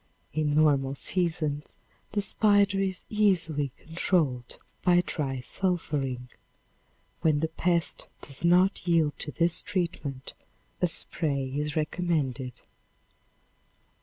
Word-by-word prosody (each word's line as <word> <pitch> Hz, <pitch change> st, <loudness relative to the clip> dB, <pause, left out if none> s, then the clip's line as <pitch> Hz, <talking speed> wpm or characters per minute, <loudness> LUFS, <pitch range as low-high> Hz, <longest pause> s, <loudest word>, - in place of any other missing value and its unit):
In 150 Hz, -1 st, 0 dB
normal 140 Hz, -3 st, +3 dB
seasons 155 Hz, -3 st, -1 dB, 0.4 s
the 205 Hz, -1 st, +1 dB
spider 205 Hz, -2 st, +3 dB
is 190 Hz, -1 st, -2 dB
easily, 165 Hz, -, +1 dB
controlled 160 Hz, -7 st, -1 dB, 0.2 s
by 180 Hz, -1 st, +4 dB
dry 135 Hz, -4 st, -2 dB
sulphuring. 140 Hz, -6 st, -1 dB, 0.9 s
When 155 Hz, -2 st, +3 dB
the 160 Hz, -, 0 dB
pest 170 Hz, +1 st, 0 dB
does 140 Hz, +2 st, -5 dB
not 180 Hz, +2 st, +3 dB
yield 165 Hz, -4 st, +3 dB
to 150 Hz, -, -4 dB
this 170 Hz, +1 st, +2 dB
treatment, 150 Hz, -7 st, -3 dB, 0.5 s
a 180 Hz, -, +4 dB
spray 140 Hz, -5 st, 0 dB
is 150 Hz, +1 st, -2 dB
recommended. 150 Hz, -6 st, -1 dB
160 Hz, 105 wpm, -28 LUFS, 140-180 Hz, 0.9 s, by